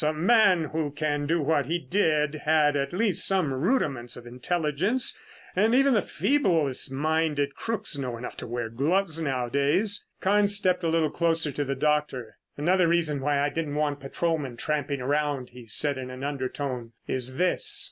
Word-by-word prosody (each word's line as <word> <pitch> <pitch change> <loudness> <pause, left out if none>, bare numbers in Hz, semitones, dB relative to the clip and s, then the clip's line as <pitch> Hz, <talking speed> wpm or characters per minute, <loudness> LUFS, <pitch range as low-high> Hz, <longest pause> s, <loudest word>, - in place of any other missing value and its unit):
A 150 - +2
man 185 +2 +4
who 155 0 -2
can 145 0 -2
do 165 +1 +1
what 145 -2 +1
he 170 +3 0
did 160 -5 +1
had 155 -1 +2
at 140 -1 -1
least 200 +1 +1
some 185 -8 +1
rudiments 135 - -1
of 120 - -11
intelligence, 165 - -1 0.4
and 220 +5 +3
even 275 +1 +4
the 215 - +3
feeblest 165 - 0
minded 150 0 0
crooks 220 -7 -2
know 125 -3 -3
enough 120 - -7
to - - -6
wear 120 -1 -3
gloves 160 +8 0
nowadays." 140 - +1
Carnes 205 +1 +3
stepped 185 -2 +1
a - - +1
little 160 -2 +1
closer 165 -3 0
to 145 - -2
the 135 0 -2
doctor. 145 -5 -1 0.2
"Another 175 +4 +3
reason 165 -4 +1
why 145 0 +1
I 145 - +1
didn't 150 -2 -3
want 150 -1 -1
patrolmen 140 -2 -2
tramping 145 -1 -2
around," 145 -1 -1
he 125 -2 -13
said 140 +5 +1
in 130 -1 -6
an 130 +1 -8
undertone, 130 -3 -4
"is 130 0 -3
this. 180 +3 +3
150 Hz, 170 wpm, -26 LUFS, 135-170 Hz, 0.4 s, man